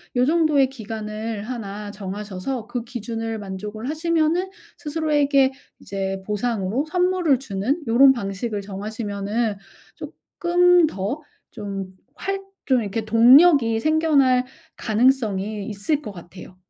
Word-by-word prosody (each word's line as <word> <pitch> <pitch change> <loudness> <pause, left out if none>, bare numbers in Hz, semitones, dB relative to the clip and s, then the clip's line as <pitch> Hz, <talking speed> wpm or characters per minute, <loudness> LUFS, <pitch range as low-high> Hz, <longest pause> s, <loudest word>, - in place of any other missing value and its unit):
요 245 - +3
정도의 305 -3 +3
기간을 220 -2 -5
1 210 -4 -6
정하셔서 205 +3 -5
그 240 -1 -4
기준을 225 -2 -5
만족을 210 +4 -6
하시면은 335 +3 0 0.3
스스로에게 295 -3 +2 0.3
이제 195 -1 -4
보상으로 215 +3 -1
선물을 360 -4 +2
주는 255 - -2
요런 265 +4 +6
방식을 205 -1 -4
정하시면은 205 +2 -3 0.4
쪼끔 355 0 +2
더 225 +3 -4 0.3
좀 195 -3 -6 0.2
활 390 +4 -3 0.3
좀 260 -3 +3
이렇게 220 +1 -3
동력이 230 +2 +6
생겨날 290 -5 +3 0.3
가능성이 215 -4 +1
있을 215 +9 -1
것 210 -7 -8
같아요. 180 +1 -12
230 Hz, 260 characters per minute, -22 LUFS, 205-285 Hz, 0.4 s, 요런